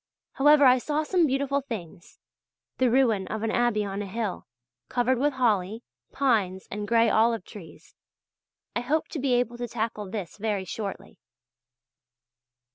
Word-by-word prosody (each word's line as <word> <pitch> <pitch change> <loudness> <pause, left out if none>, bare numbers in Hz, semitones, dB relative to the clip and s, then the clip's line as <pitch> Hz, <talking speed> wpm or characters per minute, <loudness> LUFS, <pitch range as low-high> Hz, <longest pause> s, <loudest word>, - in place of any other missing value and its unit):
However, 290 +1 +5
I 255 0 +6
saw 300 +4 -1
some 345 0 +2
beautiful 275 +1 0
things; 185 -10 -8 0.6
the 255 -1 +4
ruin 230 -6 +2
of 220 0 -4
an 225 - 0
abbey 235 -3 +1
on 200 0 -4
a 205 - -5
hill, 210 -1 -4 0.4
covered 245 +1 +1
with 290 +2 +1
holly, 220 -3 0 0.3
pines 210 -9 0
and 205 +1 -4
gray 230 0 +4
olive 225 -2 +2
trees. 195 -7 -13 0.8
I - - +1
hope 300 +6 -1
to 315 - -5
be 265 -1 +1
able 240 -1 0
to 240 - -3
tackle 220 -3 -4
this 195 -3 -6
very 205 -2 -2
shortly. 200 +2 -6
230 Hz, 150 wpm, -26 LUFS, 205-260 Hz, 0.8 s, I